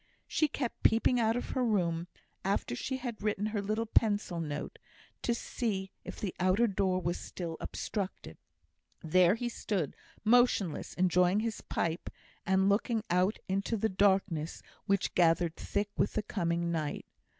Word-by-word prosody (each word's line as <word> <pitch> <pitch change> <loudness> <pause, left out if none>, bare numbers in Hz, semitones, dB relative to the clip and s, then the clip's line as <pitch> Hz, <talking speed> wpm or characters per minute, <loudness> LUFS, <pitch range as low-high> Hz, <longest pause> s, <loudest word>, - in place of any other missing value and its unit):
She 310 - +2
kept 265 -4 -4
peeping 235 +2 +4
out 225 0 +2
of 245 - -3
her 255 - 0
room, 175 -7 +1 0.4
after 195 -10 0
she 265 - -3
had 240 -4 -5
written 210 -1 0
her 215 -1 -1
little 215 +3 -1
pencil 205 -5 +1
note, 150 -3 -4 0.4
to 235 - +1
see 200 -6 -3
if - - -8
the 195 -4 -3
outer 185 +6 +4
door 190 -3 +1
was 175 0 -2
still 170 -3 -5
obstructed. 190 - -4 0.6
There 180 +3 +5
he 240 +1 -3
stood, 200 - -2 0.3
motionless, 220 -7 +3
enjoying 180 +2 +3
his 225 -1 -3
pipe, 165 +1 -2 0.4
and 190 0 +3
looking 215 +2 +1
out 180 +4 +3
into 195 +4 0
the 220 +2 +1
darkness 190 -5 +1 0.2
which 200 -1 +1
gathered 170 -1 +3
thick 205 0 -2
with - - +1
the 215 - -1
coming 170 -4 -1
night. 155 -3 -2
195 Hz, 150 wpm, -31 LUFS, 175-220 Hz, 0.6 s, There